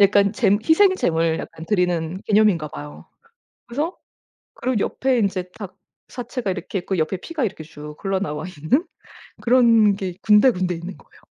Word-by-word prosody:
약간 200 0 +5
잼 205 -1 +2
희생 375 +4 +5
재물을 165 - +1
약간 160 +1 -9
드리는 180 -2 0
개념인가 205 -7 +3
봐요. 145 0 -10 0.6
그래서 295 +9 -3 0.6
그리고 255 -4 -1
옆에 260 -2 0
인제 185 -4 -1
닭 200 -4 -8 0.3
사체가 245 -3 -4
이렇게 185 +1 -4
있고 185 0 -3
옆에 160 +5 0
피가 310 - -3
이렇게 185 -7 -4
쭉 150 -1 -10
흘러 195 -1 0
나와 150 -5 -3
있는 180 - 0 0.6
그런 230 -4 +5
게 190 -3 -5
군데 210 +4 +6
군데 180 -4 -1
있는 170 +3 -8
거예요. - - -22
195 Hz, 340 characters per minute, -22 LUFS, 175-230 Hz, 0.6 s, 군데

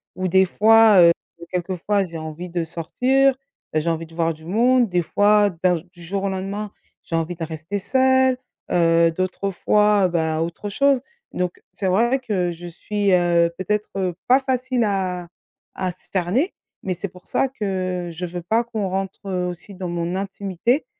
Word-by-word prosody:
où 185 0 -2
des 190 +2 +5
fois, 220 0 +6
heu, 170 -1 +8 0.4
quelquefois 185 +3 -1
j'ai 170 -2 -7
envie 160 +3 -7
de 170 0 -1
sortir 255 +12 +1 0.4
bah 155 - +2
j'ai 160 +2 -1
envie 165 0 -2
de 165 - -16
voir 165 -1 +1
du 160 0 -15
monde. 240 +5 +3
Des 180 -1 +1
fois 205 +3 +4
d'un 180 -1 +4
j 160 - -9
du 175 - -17
jour 195 +3 -3
au 200 - 0
lendemain 195 +2 -4 0.3
j'ai 165 - -4
envie 165 +2 -1
de 165 - -5
rester 160 +5 -4
seule, 260 +3 +3 0.3
heu, 165 -1 +4
d'autres 185 +3 -2
fois, 210 +2 +3
heu, - - +2
bah, 160 -2 0
autre 170 +5 -4
chose. 275 +4 +2 0.3
Donc 180 -1 -3
c'est 195 - -2
vrai 235 +8 +2
que 195 -8 -1
je 170 +1 -9
suis, 200 +4 -1
heu, 170 -1 +3
peut-être, 210 +3 -1
heu, 185 -3 -1
pas 255 +2 +6
facile 255 -2 0
à 185 -3 -1 0.5
à 185 -1 -1
cerner, 190 - -1 0.3
mais 185 - -1
c'est 190 +4 -4
pour 180 0 -17
ça - - +1
que 185 -7 -3
je 170 +2 -5
veux 175 0 -5
pas 220 +7 +1
qu'on 220 -5 -3
rentre, 190 +1 -3
heu, 180 -2 -1
aussi 180 +3 -7
dans 185 -1 -5
mon 175 +1 -2
intimité 195 - -1
185 Hz, 185 wpm, -22 LUFS, 175-210 Hz, 0.5 s, heu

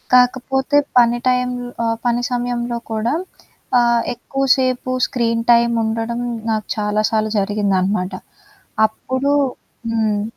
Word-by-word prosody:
కాకపోతే 265 +3 +2 0.2
పని 240 0 +3
టైంలో 250 -1 -1 0.2
ఆహ్, 225 0 0
పని 240 0 +1
సమయంలో 240 -1 -2
కూడా, 225 +5 0 0.7
ఆహ్, 235 0 +3
ఎక్కువసేపు 255 0 0 0.2
స్క్రీన్ 230 -2 0
టైమ్ 235 0 +3
ఉండడం 225 +2 -2 0.3
నాకు 215 -1 -2
చాలా 210 0 0
సార్లు 215 -1 0
జరిగిందనమాట. 195 -2 0 0.7
అప్పుడు 260 +6 -2 0.6
హ్మ్. 215 -2 0
235 Hz, 105 wpm, -19 LUFS, 215-250 Hz, 0.7 s, పని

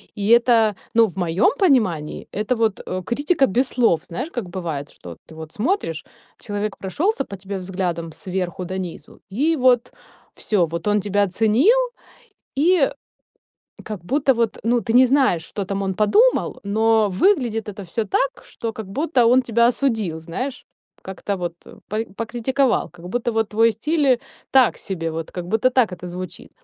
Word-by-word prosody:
И 205 +1 -2
это, 235 -3 +5 0.2
ну, 230 0 +6
в 185 - -12
моем 180 +4 +2
понимании, 215 - +1
это 215 +5 -1
вот, 225 -3 0
э, 185 0 -3
критика 290 - +2
без 245 +6 +1
слов. 225 -10 +2
Знаешь, 255 - -5
как 225 -8 -5
бывает, 165 -6 -4
что 90 - -12
вот 85 - -12
ты 160 - -13
вот 160 0 -9
смотришь, 215 - -1 0.3
человек 205 0 -4
прошелся 280 - -1
по 200 - -8
тебе 195 +1 -6
взглядом 180 -3 -3
сверху 185 -1 -4
донизу, 185 -4 -7
и 295 +11 +1
вот 250 -1 +3 0.4
всё, 195 -6 +1
вот 170 +4 -5
он 210 -1 +2
тебя 205 0 +1
оценил, 225 - +3 0.8
и 330 -1 +4 0.9
как 205 -6 -7
будто 270 +3 +2
вот, 230 -2 -1
ну, 240 +2 +3
ты 225 -1 -2
не 255 +1 +7
знаешь, 260 - +2
что 200 - -4
там 195 +1 -3
он 190 -1 -1
подумал, 420 - +3
но 220 +1 +2
выглядит 225 - +1
это 205 0 -7
всё 215 +6 -2
так, 270 +7 -1
что 230 -1 -5
как 220 -2 -7
будто 255 +2 +1
он 255 +1 +5
тебя 235 -1 +3
осудил, 220 - -1
знаешь. 250 +12 -5 0.4
Как-то 190 +1 -4
вот 175 -2 -4 0.3
по 215 +2 -2
покритиковал, 240 +3 0
как 175 0 -12
будто 240 +3 -1
вот 225 -1 0
твой 225 +2 +3
стиль 280 +3 +2 0.4
так 260 -3 +4
себе. 165 -4 -4
Вот 160 0 -5
как 175 -1 -5
будто 220 +5 +2
так 245 -6 +2
это 180 0 -7
звучит. 180 +1 -8
215 Hz, 170 wpm, -21 LUFS, 185-250 Hz, 0.9 s, не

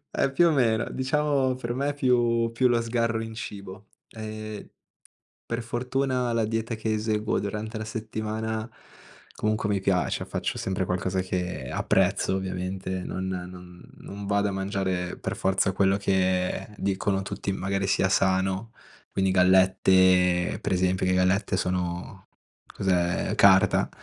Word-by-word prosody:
Eh, 135 - +1
più 170 +5 +4
o - - +3
meno, 115 -5 +2
diciamo 135 -1 +1
per 120 -2 -4
me 140 +3 -1
più 120 -3 +2
più 125 +2 +2
lo 120 -1 +2
sgarro 115 -1 0
in 110 - -7
cibo. 100 -3 -8 0.2
Ehm, 110 -1 -7 0.8
per 115 +1 -3
fortuna 125 +1 -1
la 115 -1 +1
dieta 115 +1 -2
che 110 0 -2
eseguo 110 0 0
durante 105 +2 -4
la 110 - -4
settimana 110 +1 -4 0.6
comunque 110 0 -1
mi 100 -2 +1
piace, 95 -2 0
faccio - - -3
sempre 95 0 -2
qualcosa 95 +1 -1
che 90 -7 -3
apprezzo, 95 - +1
ovviamente, 95 0 -4
non 95 +1 -4
non 90 -1 -7 0.2
non 100 0 -8
vado 100 0 +1
a - - -3
mangiare 95 -2 -2
per - - -3
forza 95 0 +1
quello 95 +1 +2
che 95 -2 0
dicono 95 0 -1
tutti, 95 - -4
magari 95 0 -2
sia 95 - +2
sano. 95 +3 +1 0.4
Quindi 95 -1 +1
gallette 95 -1 +4
per - - -3
esempio, 95 0 +1
le 95 - +2
gallette 95 +2 +2
sono 90 +1 -3 0.4
cos'è? 90 -2 0
Carta. 95 0 +5
100 Hz, 140 wpm, -26 LUFS, 95-110 Hz, 0.8 s, Carta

